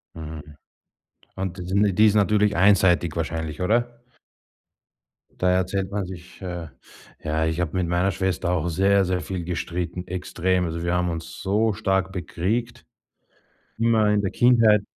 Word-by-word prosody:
Mhm. 80 -1 -7 0.9
Und 95 -1 -4
die 90 - -6
sin 100 +1 +2
die 110 - +5
ist 105 - +2
natürlich 105 0 +3
einseitig 90 -4 +4
wahrscheinlich, 80 0 -3
oder? 120 +4 0 1.4
Da 90 0 +3
erzählt 95 +1 0
man 100 -2 -2
sich, 90 +1 -11
äh, 85 -3 -5 0.6
ja 80 +1 0
ich 80 +2 -1
habe 85 -1 -2
mit 90 -2 0
meiner 90 +3 +1
Schwester 95 -1 -1
auch 85 -1 0
sehr, 95 +3 +3
sehr 90 0 0
viel 90 +2 -4
gestritten, 90 +1 -4
extrem. 90 0 -1
Also, 85 +1 -4
wir 85 +1 0
haben 90 0 +1
uns 85 0 -6
so 105 +2 +1
stark 95 0 0
bekriegt, 110 +8 -3 0.9
immer 110 -2 +3
in 105 -1 +2
der 95 - -2
Kindheit. 115 -4 +4
90 Hz, 150 wpm, -24 LUFS, 85-100 Hz, 1.4 s, die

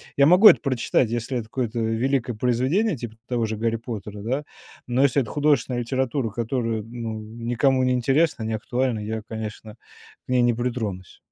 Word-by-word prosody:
Я 140 - +5
могу 180 +8 +8
это - - +7
прочитать, 130 -3 +1
если 120 +2 -2
это 115 - -6
какое-то, 120 -2 -2
э, - - 0
великое 125 +3 0
произведение, 130 - +1
типа 115 -3 -7
т - - -37
того 120 -2 0
же 110 0 -3
Гарри 115 +1 0
Поттера, 105 -3 -7
да, 130 +6 -1 0.4
но 125 +2 +2
если 140 0 +3
это 120 - -5
художественная 140 -4 +1
литература, 130 0 -1
которая, 115 0 -2
ну, 115 -1 -6
м, 110 +2 -9
никому 130 +2 +2
не 130 - +2
интересна, 135 +1 +1
не 110 - -2
актуальна, 120 +1 -1
я, 110 +1 -4
конечно, 110 -1 -7 0.5
к - - -23
ней 125 -1 +3
не 120 0 +3
притронусь. 110 -6 -4
120 Hz, 190 wpm, -24 LUFS, 110-130 Hz, 0.5 s, могу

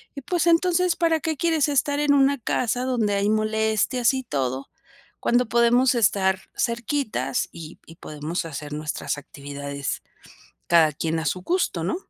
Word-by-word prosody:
y 280 - -6
pues, 345 +5 -1
entonces, 350 +1 +3
para 330 -2 +2
qué 315 -2 -2
quieres 320 -3 +2
estar 285 0 +1
en 295 -1 +3
una 275 0 +4
casa, 245 +2 -1
donde 235 -5 0
hay 200 +1 +1
molestias 220 +3 +1
y 260 - -3
todo, 135 - -3 0.5
cuando 245 0 +2
podemos 240 +2 +4
estar 195 -4 +2
cerquita, 240 +1 -1 0.2
y 165 0 -10
y 165 - -14
podemos 155 +3 -5
hacer 150 -1 -6
nuestras 150 -1 -3
actividades 140 0 -6 0.7
cada 165 -2 +5
quien 160 +2 -2
a - - -4
su 180 +6 -1
gusto, 340 - -1
¿no? 185 - -1
220 Hz, 155 wpm, -24 LUFS, -, 0.7 s, cada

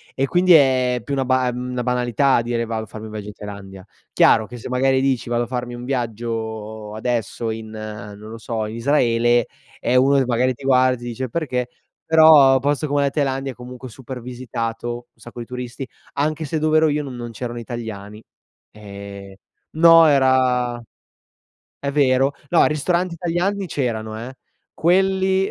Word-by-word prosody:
E 135 - +1
quindi 180 +4 +4
è 130 -4 +4
più 140 - -5
una 135 -1 0
ba 130 0 +2
ehm, 125 +1 -5
una 125 -1 -2
banalità 125 +1 +2
dire, 115 0 -2
vado 110 -1 -3
a - - -8
farmi 110 +2 -9
un - - -10
viaggio 105 -1 -7
in 105 - -7
Thailandia. 100 -2 -10 0.3
Chiaro, 110 -2 +4
che 120 +2 -9
se - - -8
magari 130 +1 +2
dici, 130 -3 0
vado 120 0 +1
a - - -6
farmi 125 -1 -4
un 120 - -8
viaggio 110 -3 -4
adesso 115 -1 -2
in 110 0 -7
non 105 -1 -8
lo 115 - -8
so, 110 -1 -3
in 110 +1 -6
Israele, 120 -2 +2 0.3
eh, 125 - 0
uno 135 +2 +4
che 135 - +2
magari 125 +1 +1
ti 140 - -15
guarda, 130 -1 +3
ti 120 - -13
dice: 120 +1 -4
"Perché?" 125 -5 -2 0.4
Però, 155 -4 +7
posto 145 +3 0
come 145 0 +1
la 140 - +2
Thailandia, 135 -2 -2
comunque 125 +1 -10
super 125 +1 -9
visitato, 120 -1 -4 0.2
un - - -30
sacco 120 0 -9
di - - -7
turisti. 125 +1 -6 0.3
Anche 155 +2 -1
se 155 +3 -2
dov'ero 155 +1 +3
io, 150 0 0
non 135 -3 -7
non 120 -1 -6
c'erano 120 +1 -6
italiani. 110 -3 -7 0.5
Ehm, 100 -1 -10 0.4
no 165 0 +7
era 130 -3 +2 1.0
è 140 - -2
vero. 135 -1 +2 0.2
No, 175 - +5
ristoranti 170 +4 0
italiani 180 +4 -1
c'erano 110 -7 -3
eh. 130 - -11 0.4
Quelli, 190 +2 +2
125 Hz, 175 wpm, -21 LUFS, 115-140 Hz, 1.0 s, Però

